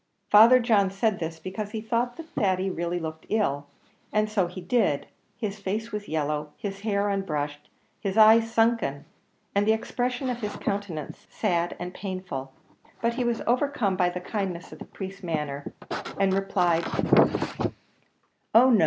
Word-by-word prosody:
Father 230 +5 +9
John 215 -5 +3
said 195 +1 0
this 160 0 -4
because 190 +5 -5
he 220 - -4
thought 235 +2 -1
that 330 -1 -8
Thady 190 -4 +1
really 175 0 -2
looked 160 -1 -6
ill. 145 -10 0 0.4
And 215 0 +2
so 195 -4 +2
he 180 +2 -8
did; 185 - +1 0.3
his 210 -3 -4
face 215 +4 -3
was 210 -1 -4
yellow, 150 -1 -2
his 195 -1 -5
hair 205 -1 0
unbrushed, 150 -7 -2 0.3
his 200 0 -2
eyes 225 +1 +7
sunken, 225 -12 +1 0.5
and 200 +1 +2
the 220 - +6
expression 245 +3 -2
of 240 - -4
his 210 -1 -3
countenance 195 -7 -4
sad 175 -5 0
and 180 +1 -5
painful; 185 -10 -5 0.5
but 235 0 +1
he 250 +1 -1
was 240 -1 0
overcome 245 -5 +1
by 180 -1 +3
the 180 +1 -4
kindness 185 -3 -3
of - - -10
the - - -8
priest's 195 0 -8
manner, 150 -5 -3 0.5
and 195 -1 +3
replied, 185 -4 +2 1.7
"Oh 255 +3 +8
no! 225 - +5
195 Hz, 160 wpm, -26 LUFS, 175-220 Hz, 1.7 s, Father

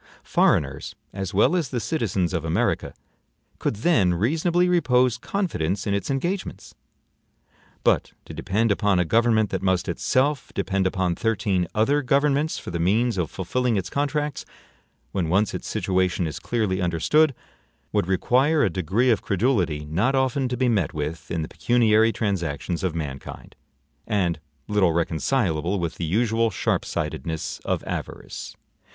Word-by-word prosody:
Foreigners, - - +1 0.2
as 95 -2 -4
well 105 - +3
as 165 -7 0
the 125 - -2
citizens 100 - -1
of 85 -3 -1
America, 80 0 0 0.7
could - - -1
then 100 - +2
reasonably 165 - +2
repose 130 -9 +3
confidence 105 - -2
in 100 - 0
its 100 +6 -2
engagements; 175 +8 -3 1.1
but - - +2
to - - -9
depend 105 +4 0
upon 100 -1 +2
a 90 - +2
government 110 +2 +2
that 95 - -2
must 95 -1 +1
itself 130 - 0
depend 95 -1 0
upon 95 -2 0
thirteen 100 -4 0
other 140 +7 +3
governments 140 +3 +1
for - - -7
the 85 - -3
means 110 +7 +2
of 80 -4 -1
fulfilling 120 +5 -1
its 95 0 -3
contracts, 145 +1 -1 0.7
when 90 -5 -1
once 100 +4 +2
its - - -5
situation 90 -1 0
is 80 -3 -4
clearly 105 -6 -1
understood, 125 - +2 0.6
would - - +1
require 130 - +2
a 95 - +2
degree 95 +9 +1
of 110 - +1
credulity 95 - 0
not 95 - +1
often 130 0 +1
to 125 - -2
be 130 +1 +2
met 100 -12 +1
with 75 0 -4
in 85 -2 -2
the - - -5
pecuniary 115 -2 +3
transactions 90 -5 -2
of 90 -3 -1
mankind, 70 -5 -6 0.5
and 90 -5 0 0.3
little 100 -5 +2
reconcilable 85 - 0
with 85 -2 -3
the 85 - -2
usual 115 +5 +1
sharp 100 - -1
sightedness 80 -1 -4
of - - -1
avarice. - - -6
100 Hz, 150 wpm, -24 LUFS, 90-125 Hz, 1.1 s, well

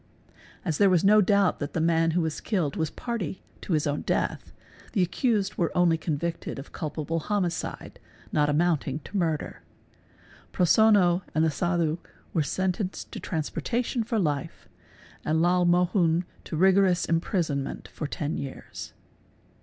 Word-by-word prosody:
| - - -25
As 160 -5 -1
there 200 - +6
was 180 -3 +3
no 210 +2 +6
doubt 200 -1 +3
that 145 0 -4
the - - -1
man 165 0 +3
who - - +3
was 160 -2 -2
killed 175 -10 -1
was 160 -1 -1
party 210 -7 -4 0.2
to 185 - -2
his 155 -2 +1
own 145 0 -1
death - - -2 0.4
the 195 - +3
accused 205 +2 0
were 170 - +1
only 175 -2 +4
convicted 165 +1 -3
of 135 - -9
culpable 155 +1 -3
homicide 180 -1 -3 0.3
not 150 -1 +2
amounting 150 -3 +1
to 190 - -11
murder. 165 -5 -1 0.9
Prosonno 185 -1 +4
and 155 +1 +3
the 160 - +2
Sadhu 170 0 0 0.3
were 165 - +2
sentenced 185 +5 -2
to - - -6
transportation 230 - -2
for 225 +1 -2
life 150 -8 -2 0.6
and 155 +1 +1
Lal 175 +1 +3
Mohun 175 -1 +3 0.2
to - - -5
rigorous 190 0 +4
imprisonment 165 -4 -1
for 150 - -5
ten 150 +1 -3
years. 135 -1 -8
170 Hz, 150 wpm, -27 LUFS, 155-190 Hz, 0.9 s, there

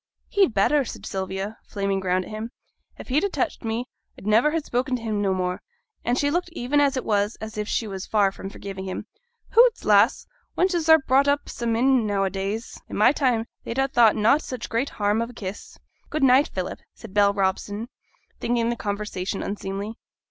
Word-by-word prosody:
'He'd 390 - +3
better,' 280 +9 +3
said - - -8
Sylvia, 190 +2 -4
flaming 195 -1 -1
round 185 0 0
at - - -11
him. 215 +2 -5 0.5
'If - - -10
he'd 285 +7 +2
a 400 - +1
touched 355 -3 -2
me, 225 +2 -2 0.3
I'd - - -12
niver 220 +7 +4
ha' 320 - 0
spoken 255 -1 -1
to 245 - -5
him 215 -2 -1
no 195 -1 +1
more.' 180 -1 -1 0.4
And 245 +1 +1
she 285 0 +1
looked 350 +2 -1
even 290 0 +1
as 280 -2 +2
it - - -3
was 205 0 +1
as 220 +1 -7
if 210 -1 -3
she 225 - -1
was 190 -2 -6
far 205 -3 +3
from 195 - -8
forgiving 195 -1 -7
him. 190 +2 -5 0.5
'Hoots, 475 0 +5
lass! 210 +4 +4 0.3
wenches 350 -4 +1
are 320 - +10
brought 275 -1 +2
up 285 0 +1
sa 235 - -4
mim, 235 0 +3
now 200 -1 +1
a 190 - 0
days; 195 +4 -4
i' - - -9
my 210 +4 +5
time 250 -6 +1 0.2
they'd 230 - -5
ha' 270 - +3
thought 235 -5 +5
na' 220 +7 +4
such 255 -5 -6
great 235 +5 0
harm 210 +1 0
of 230 - -3
a - - -11
kiss.' 200 -3 -7 0.3
'Good 305 -2 -1
night, 265 +2 +6
Philip,' 185 -1 -4 0.2
said 225 -4 -12
Bell 205 -1 +5
Robson, 200 +2 -1 0.5
thinking 235 -1 0
the 240 - 0
conversation 205 -3 -3
unseemly. 200 +2 -5
220 Hz, 205 wpm, -24 LUFS, 200-260 Hz, 0.5 s, are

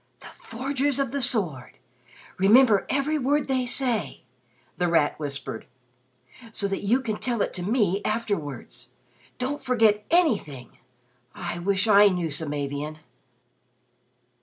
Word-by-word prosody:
"'The - - -11
Forgers 275 +3 -2
of 275 -3 -1
the 280 0 -2
Sword.' 185 - -1 0.6
Remember 215 +2 +5
every 290 +3 0
word 290 +2 +1
they 260 -2 0
say," 245 -4 -1 0.6
The 175 - +2
Rat 165 -4 +1
whispered, 140 -6 -6 0.8
"so 205 -2 -2
that 195 0 -3
you 230 +6 +2
can 220 -4 -4
tell 240 -2 -1
it - - -4
to 180 - -5
me 205 -1 +1
afterwards. 205 - -4 0.5
Don't 275 +4 -3
forget 220 -4 +2
anything! 210 - 0 0.6
I 175 0 -5
wish 195 +3 +1
I 205 -1 +7
knew 180 -4 -1
Samavian." 145 0 -2
210 Hz, 125 wpm, -25 LUFS, 170-255 Hz, 0.8 s, I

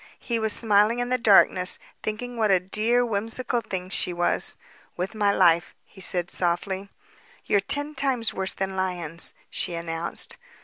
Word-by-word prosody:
He 235 -2 -3
was 220 -1 -1
smiling 210 +1 +3
in 245 0 -2
the 255 0 0
darkness, 190 -4 +4 0.2
thinking 245 +3 -5
what 220 -2 +1
a 190 -2 +4
dear, 220 +6 +1
whimsical 225 +3 -2
thing 185 -4 -5
she 180 - 0
was. 175 0 -1 0.4
"With 185 +4 -3
my 205 -2 +1
life," 170 -2 +3
he 190 - -16
said 175 -1 -2
softly. 190 +3 -2 0.6
"They're 205 - +3
ten 290 +9 +2
times 255 -6 0
worse 190 0 -2
than 190 0 -3
lions," 175 -3 +2 0.2
she 175 - -3
announced. 170 0 -1
200 Hz, 160 wpm, -25 LUFS, 180-230 Hz, 0.6 s, darkness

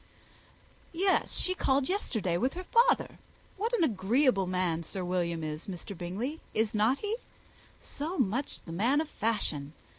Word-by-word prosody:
"Yes, 375 +3 +2
she 370 - +4
called 270 -6 +1
yesterday 220 - -1
with 255 - 0
her 365 - -5
father. 470 +4 +3 0.4
What 440 +4 -1
an 350 - +2
agreeable 220 - +2
man 180 -3 0
Sir 180 +2 -4
William 170 -2 -1
is, 155 +1 -5
Mr. 195 +1 -6
Bingley 200 - -4
is 220 +1 +1
not 220 +5 +3
he? 425 +6 -2 0.6
so 315 +6 -4
much 255 +3 0
the 165 - -8
man 235 - +2
of 315 - -1
fashion! 160 -10 -1
220 Hz, 150 wpm, -30 LUFS, 180-300 Hz, 0.6 s, she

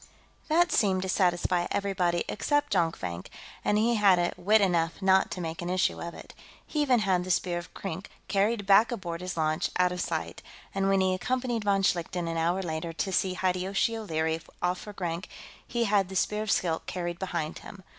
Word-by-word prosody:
That 345 +3 +3
seemed 190 -3 +2
to 190 - -3
satisfy 175 -1 +1
everybody 185 -4 0
except 290 +6 0
Jonkvank, 160 - -1 0.4
and 210 - +2
he 230 +3 +3
had 185 -4 +4
wit 205 +5 +4
enough 170 -4 +1
not 190 -1 +4
to 180 - -5
make 165 0 -4
an 175 - -4
issue 185 0 +1
of 170 0 -6
it. - - -11 0.3
He 305 - -1
even 255 -5 +3
had 185 -3 +2
the 185 - -7
Spear 175 -1 +1
of 175 - -11
Krink 195 0 -5 0.2
carried 205 +1 +1
back 205 +4 +6
aboard 175 -7 -4
his 180 -1 -5
launch, 155 +1 +1
out 180 0 +3
of 180 0 -3
sight, - - -3 0.3
and 195 0 +1
when 195 -1 +3
he 185 0 +2
accompanied 245 +3 -1
von 195 -1 +2
Schlichten, 175 -1 0
an 165 - -2
hour 175 +4 +1
later, 165 0 -3
to 190 +4 -2
see 185 0 +1
Hideyoshi 190 +5 0
O'Leary 160 -6 -1 0.2
off 180 +1 0
for 210 - -9
Grank, 175 -2 -4 0.4
he 235 0 0
had 200 -4 +2
the 190 - -7
Spear 210 +3 +1
of 215 - -4
Skilk 165 -4 0
carried 175 -1 -4
behind 170 -4 -3
him. 195 -1 -12
185 Hz, 195 wpm, -28 LUFS, 175-200 Hz, 0.4 s, back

